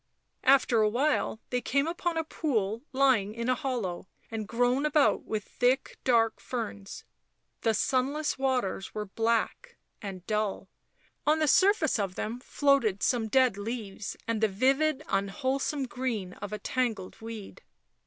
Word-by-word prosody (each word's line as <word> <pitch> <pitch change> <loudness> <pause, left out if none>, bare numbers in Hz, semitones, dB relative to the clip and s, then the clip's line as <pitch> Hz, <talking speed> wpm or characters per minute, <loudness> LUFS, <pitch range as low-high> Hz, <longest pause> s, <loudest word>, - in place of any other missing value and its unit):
After 255 -4 +5
a 215 - +4
while 255 -1 +1
they 250 0 0
came 280 +3 +1
upon 340 0 -2
a 325 - +1
pool 230 -9 -1
lying 255 -7 +3
in 235 +1 -3
a - - +5
hollow 230 -9 -3 0.2
and 220 -2 -4
grown 245 +4 +1
about 300 -1 +3
with 215 -1 -2
thick, 250 +4 0
dark 230 -3 +3
ferns; 210 -5 -5 0.6
the 225 -1 +2
sunless 275 +6 0
waters 250 -8 -1
were 210 0 -2
black 230 - -1 0.2
and 190 -3 -7
dull, 215 -2 -1 0.6
on 305 +1 +5
the 310 -1 +1
surface 370 - +4
of 195 -3 -2
them 230 +3 -3
floated 260 -7 +2
some 235 -3 +2
dead 255 -3 +3
leaves 210 -2 -5
and 230 -1 -1
the 220 - +5
vivid 270 +8 +2
unwholesome 260 +8 -1
green 240 -7 -3
of 205 - -7
a 210 - -3
tangled 225 -7 -2
weed. 225 -3 -8
240 Hz, 145 wpm, -29 LUFS, 210-270 Hz, 0.6 s, After